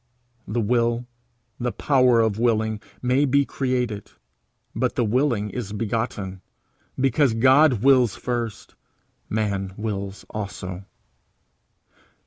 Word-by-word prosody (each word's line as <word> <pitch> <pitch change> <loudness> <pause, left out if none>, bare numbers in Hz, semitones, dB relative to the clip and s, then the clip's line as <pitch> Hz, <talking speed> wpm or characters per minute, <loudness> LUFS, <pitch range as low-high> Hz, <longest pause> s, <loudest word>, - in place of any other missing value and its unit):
The 115 +3 -1
will, 120 +2 +1 0.5
the 125 0 -1
power 125 -4 +3
of 110 -1 0
willing, 110 -2 +1 0.2
may 125 +3 +3
be 140 0 +3
created, 125 -7 -2 0.7
but 125 +3 0
the 120 - +2
willing 115 -3 +1
is 105 -2 -5
begotten. 105 -3 -3 0.6
Because 135 -1 +2
God 130 0 +5
wills 130 -6 +5
first, 120 -3 -4 0.6
man 100 -3 -2
wills 100 -2 -4
also. 95 -3 -6
115 Hz, 105 wpm, -23 LUFS, 105-125 Hz, 0.7 s, God